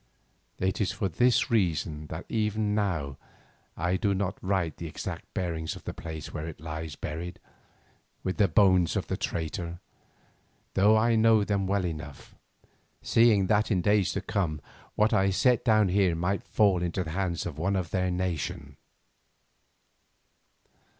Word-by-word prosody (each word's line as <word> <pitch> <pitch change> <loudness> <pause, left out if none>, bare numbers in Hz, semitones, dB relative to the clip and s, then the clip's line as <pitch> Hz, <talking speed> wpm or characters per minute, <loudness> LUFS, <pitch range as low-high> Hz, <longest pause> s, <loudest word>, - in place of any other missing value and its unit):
It 95 +3 -1
is 100 - +1
for 95 - -2
this 120 +9 +2
reason 80 -7 0
that - - -7
even 105 -1 0
now 85 -10 -1 0.6
I 90 +3 0
do 100 0 +1
not 95 -1 -2
write 95 -4 0
of - - -38
the 85 - -5
exact 75 - -6
bearings 80 -3 -2
of - - -12
the - - -5
place 80 -2 -7
where 75 +1 -4
it 80 - -8
lies 80 -1 -6
buried 85 +3 -5 0.9
with 95 - -2
the 100 - +4
bones 95 -1 +4
of - - -1
the - - -2
traitor, 85 +1 -4 0.9
though 105 +3 +5
I 115 +1 +3
know 110 -1 +5
them 100 -2 0
well 100 -1 +1
enough, 75 -4 -7 0.7
seeing 115 -4 +4
that 105 +2 +2
in 95 -4 +2
days 105 -1 +3
to 100 - -2
come 90 -7 -1 0.4
what 105 +1 +3
I 95 0 +3
set 120 +6 +2
down 110 -4 +4
here 95 -2 +2
might 90 +4 -1
fall 100 -5 +2
into 90 +1 -1
the 80 - -6
hands 90 -1 -2
of 75 -3 -5
one 100 +4 0
of 90 -3 -2
their 95 -1 0
nation. 90 -3 -3
95 Hz, 160 wpm, -28 LUFS, 85-105 Hz, 0.9 s, though